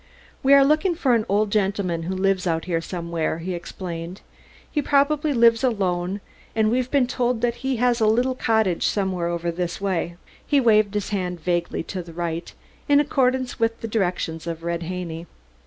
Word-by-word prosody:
"We 275 Hz, +1 st, +6 dB
are 275 Hz, -1 st, +7 dB
looking 310 Hz, +5 st, +2 dB
for 275 Hz, -7 st, +2 dB
an 225 Hz, -2 st, +1 dB
old 205 Hz, +1 st, +2 dB
gentleman 195 Hz, -5 st, 0 dB
who 190 Hz, -, -2 dB
lives 190 Hz, -1 st, +1 dB
out 165 Hz, -1 st, 0 dB
here 170 Hz, -3 st, -1 dB
somewhere," 170 Hz, -2 st, -3 dB
he 180 Hz, +3 st, -4 dB
explained. 175 Hz, 0 st, -6 dB, 0.5 s
"He 295 Hz, -, 0 dB
probably 290 Hz, +2 st, +2 dB
lives 235 Hz, -2 st, +4 dB
alone, 190 Hz, -5 st, 0 dB, 0.3 s
and 220 Hz, -1 st, +2 dB
we've 250 Hz, +1 st, 0 dB
been 275 Hz, -2 st, +3 dB
told 245 Hz, -2 st, -1 dB
that 240 Hz, 0 st, 0 dB
he 265 Hz, 0 st, 0 dB
has 245 Hz, 0 st, +2 dB
a 215 Hz, -, +4 dB
little 245 Hz, +4 st, +2 dB
cottage 220 Hz, -8 st, +1 dB
somewhere 190 Hz, -4 st, -1 dB
over 170 Hz, 0 st, -2 dB
this 175 Hz, 0 st, -3 dB
way." 185 Hz, -3 st, -1 dB, 0.3 s
He 285 Hz, -, +2 dB
waved 215 Hz, -4 st, +3 dB
his 205 Hz, -1 st, -1 dB
hand 180 Hz, -4 st, -2 dB
vaguely 175 Hz, 0 st, -1 dB
to 185 Hz, +2 st, -5 dB
the 170 Hz, -1 st, -11 dB
right, 170 Hz, 0 st, -4 dB, 0.4 s
in 285 Hz, 0 st, +6 dB
accordance 260 Hz, -3 st, +1 dB
with 230 Hz, 0 st, 0 dB
the 225 Hz, -, -3 dB
directions 175 Hz, -6 st, -2 dB
of 165 Hz, -1 st, -5 dB
Red 170 Hz, 0 st, -2 dB
Haney. 170 Hz, -1 st, -5 dB
200 Hz, 185 wpm, -23 LUFS, 175-245 Hz, 0.5 s, are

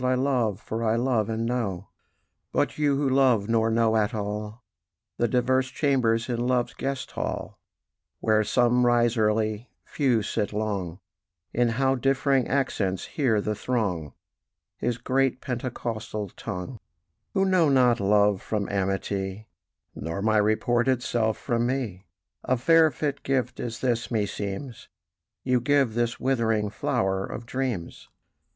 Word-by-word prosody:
I 130 Hz, 0 st, +2 dB
love, 125 Hz, -6 st, +1 dB
for 115 Hz, 0 st, -4 dB
I 110 Hz, 0 st, +2 dB
love 115 Hz, -3 st, +1 dB
and 115 Hz, +1 st, -1 dB
know; 115 Hz, -7 st, -2 dB, 0.6 s
"But -, -, 0 dB
you, 145 Hz, -2 st, +2 dB
who 140 Hz, 0 st, +1 dB
love 130 Hz, -6 st, +3 dB
nor 115 Hz, -1 st, +2 dB
know 115 Hz, 0 st, +2 dB
at 110 Hz, +1 st, +1 dB
all 105 Hz, +2 st, -4 dB, 0.5 s
The 120 Hz, -, +2 dB
diverse 130 Hz, +2 st, +2 dB
chambers 125 Hz, -6 st, +1 dB
in 120 Hz, -2 st, -2 dB
Love's 125 Hz, -1 st, +1 dB
guest 135 Hz, -1 st, -4 dB
hall, -, -, -4 dB, 0.6 s
Where 110 Hz, -1 st, +3 dB
some 125 Hz, +3 st, +3 dB
rise 120 Hz, -1 st, +3 dB
early, 110 Hz, +1 st, 0 dB, 0.2 s
few 125 Hz, -7 st, +1 dB
sit 105 Hz, 0 st, -2 dB
long: 100 Hz, -5 st, -3 dB, 0.5 s
In 120 Hz, 0 st, +2 dB
how 135 Hz, 0 st, +3 dB
differing 135 Hz, 0 st, +1 dB
accents 105 Hz, -9 st, -1 dB
hear 125 Hz, -8 st, +2 dB
the 105 Hz, -, -1 dB
throng 100 Hz, -, -2 dB, 0.6 s
His 120 Hz, -1 st, -1 dB
great 130 Hz, +1 st, +1 dB
Pentecostal 115 Hz, -5 st, -4 dB
tongue; 100 Hz, +5 st, -6 dB, 0.6 s
"Who 195 Hz, -1 st, +3 dB
know 185 Hz, -5 st, +3 dB
not 125 Hz, -3 st, +4 dB
love 100 Hz, 0 st, +3 dB
from 105 Hz, -2 st, -2 dB
amity, 95 Hz, +1 st, -2 dB, 0.4 s
Nor 85 Hz, +5 st, -4 dB
my 110 Hz, 0 st, +3 dB
reported 120 Hz, +4 st, +2 dB
self 110 Hz, -2 st, 0 dB
from 120 Hz, -2 st, 0 dB
me; 115 Hz, -9 st, -3 dB, 0.4 s
A 130 Hz, 0 st, +1 dB
fair 160 Hz, +5 st, +5 dB
fit 145 Hz, 0 st, -3 dB
gift 130 Hz, -2 st, -1 dB
is 115 Hz, -2 st, -5 dB
this, 120 Hz, -2 st, 0 dB
meseems, 105 Hz, +2 st, -3 dB, 0.6 s
You 125 Hz, -2 st, +2 dB
give 135 Hz, -3 st, +2 dB
this 120 Hz, 0 st, -1 dB
withering 115 Hz, -5 st, +1 dB
flower 95 Hz, -1 st, 0 dB
of 115 Hz, -, -6 dB
dreams. 125 Hz, -9 st, -4 dB
115 Hz, 140 wpm, -26 LUFS, 105-130 Hz, 0.6 s, fair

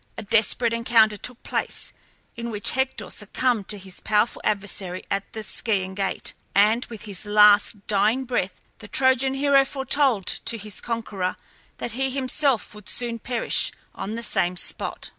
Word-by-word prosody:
A -, -, -5 dB
desperate 225 Hz, +2 st, +3 dB
encounter 230 Hz, -2 st, +4 dB
took 245 Hz, +4 st, -7 dB
place, -, -, -3 dB, 0.4 s
in 235 Hz, 0 st, -5 dB
which 210 Hz, -3 st, +3 dB
Hector 260 Hz, -7 st, -2 dB
succumbed 215 Hz, 0 st, -1 dB
to 210 Hz, -, -1 dB
his 190 Hz, -1 st, -6 dB
powerful 210 Hz, +2 st, +1 dB
adversary 195 Hz, -3 st, -2 dB
at 195 Hz, 0 st, -2 dB
the 220 Hz, -, -5 dB
Scaean 195 Hz, -4 st, -1 dB
gate; 195 Hz, 0 st, -2 dB, 0.2 s
and 215 Hz, +5 st, +4 dB
with 225 Hz, -3 st, -10 dB
his 200 Hz, -4 st, -4 dB
last 210 Hz, 0 st, +5 dB
dying 215 Hz, +5 st, +2 dB
breath 220 Hz, -7 st, -2 dB, 0.2 s
the -, -, -10 dB
Trojan 260 Hz, +2 st, +2 dB
hero 275 Hz, 0 st, +4 dB
foretold 265 Hz, -5 st, +1 dB
to 230 Hz, -, +1 dB
his 210 Hz, -1 st, -5 dB
conqueror 210 Hz, -6 st, -3 dB, 0.4 s
that -, -, -4 dB
he 265 Hz, +4 st, -1 dB
himself 265 Hz, -2 st, 0 dB
would 210 Hz, -2 st, -8 dB
soon 235 Hz, -1 st, -1 dB
perish 240 Hz, 0 st, -1 dB, 0.2 s
on 210 Hz, +3 st, -5 dB
the 235 Hz, -, -3 dB
same 180 Hz, -4 st, 0 dB
spot. -, -, -1 dB
220 Hz, 160 wpm, -24 LUFS, 205-245 Hz, 0.4 s, last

